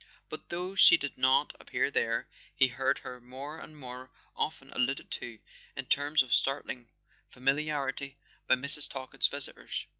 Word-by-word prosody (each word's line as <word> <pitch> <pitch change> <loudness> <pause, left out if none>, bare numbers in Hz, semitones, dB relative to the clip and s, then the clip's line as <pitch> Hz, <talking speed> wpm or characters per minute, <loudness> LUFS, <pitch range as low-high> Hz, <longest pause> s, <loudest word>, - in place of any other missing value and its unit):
But - - -9
though 180 +2 -4
she 195 - +8
did 140 -1 -3
not 130 +1 +3
appear - - -1
there, - - 0 0.3
he 130 - +4
heard 135 +2 0
her 125 -1 -8
more 135 +6 -8
and 155 - -11
more 130 -1 -9 0.3
often - - -4
alluded 130 +2 -1
to, 115 -2 -3 0.4
in 135 - -5
terms 145 +2 +3
of 125 - -3
startling 130 -3 0 0.4
famili¬ 135 +4 0
arity, 140 -2 -3 0.3
by - - +6
Airs. 140 +3 +3
Talkett's 130 -1 0
visitors. - - -1
135 Hz, 155 wpm, -30 LUFS, 130-145 Hz, 0.4 s, she